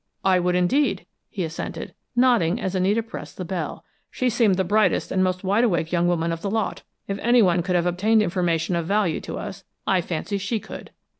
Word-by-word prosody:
"I 185 -1 +4
would, 180 0 +1
indeed," 220 +12 +1 0.2
he 190 - -3
assented, 160 0 -5 0.2
nodding 240 -6 +3
as 190 -5 -2
Anita 195 +4 +1
pressed 225 - -9
the 185 - -4
bell. 170 -4 -4 0.2
"She 255 -1 0
seemed 220 -4 +3
the 190 - +1
brightest 205 0 +2
and 185 0 +2
most 185 0 -1
wide 200 +5 +2
awake 170 -8 +1
young 175 0 +2
woman 170 -1 +1
of 165 0 -4
the 200 - -2
lot. 220 0 -1 0.3
If 195 0 -3
anyone 210 -8 +4
could 180 +1 -1
have 175 -1 +2
obtained 210 +5 +3
information 175 -2 0
of 170 -1 -2
value 200 -5 +1
to - - -6
us, - - -7 0.2
I 190 -2 +2
fancy 180 +4 -3
she 205 +3 -1
could. - - -9
185 Hz, 205 wpm, -23 LUFS, 175-215 Hz, 0.3 s, I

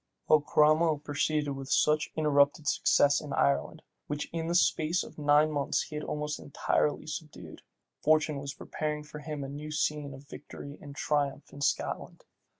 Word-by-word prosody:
While 155 -1 +5
Cromwell 155 +2 +4
proceeded 145 0 -1
with 135 -1 -6
such 150 +2 +3
uninterrupted 145 0 +3
success 145 -1 +3
in 145 -3 -6
Ireland, 70 - +1 0.2
which 150 0 -4
in 165 -1 -2
the 170 - 0
space 170 0 +2
of - - -12
nine 150 +1 +4
months 145 -2 0
he 150 - -9
had 150 - -3
almost 150 0 -3
entirely 145 +1 0
subdued, 155 -1 -8 0.4
fortune 155 -1 +2
was 140 0 -6
preparing 150 -1 -4
for 150 0 -10
him 150 -1 -5
a - - -5
new 145 +2 -7
scene 150 -2 -1
of 135 +1 -14
victory 140 0 -10
and 145 -1 -10
triumph 145 -1 -1
in 140 - -10
Scotland. - - -2
150 Hz, 165 wpm, -30 LUFS, 140-155 Hz, 0.4 s, While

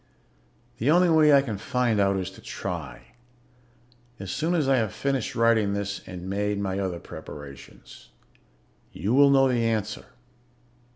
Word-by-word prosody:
The 125 - +1
only 175 +3 +5
way 155 -2 +5
I 140 -1 +6
can 110 -7 -5
find 120 -1 0
out 100 -1 +2
is 95 0 -4
to - - -15
try, 75 -9 -7 1.1
as 95 -2 -6
soon 165 - -1
as 155 -5 +1
I 135 -1 +3
have 110 -4 0
finished 135 -4 -2
writing 115 -3 +2
this 100 0 -4
and 90 0 -8
made 100 +1 -1
my 95 -1 -2
other 95 -3 -3
preparations. 70 -4 -12 0.8
"You 100 +8 -2
will 140 +1 +6
know 135 -1 +5
the 120 -2 +1
answer. 110 -2 -2
105 Hz, 155 wpm, -25 LUFS, 95-135 Hz, 1.1 s, I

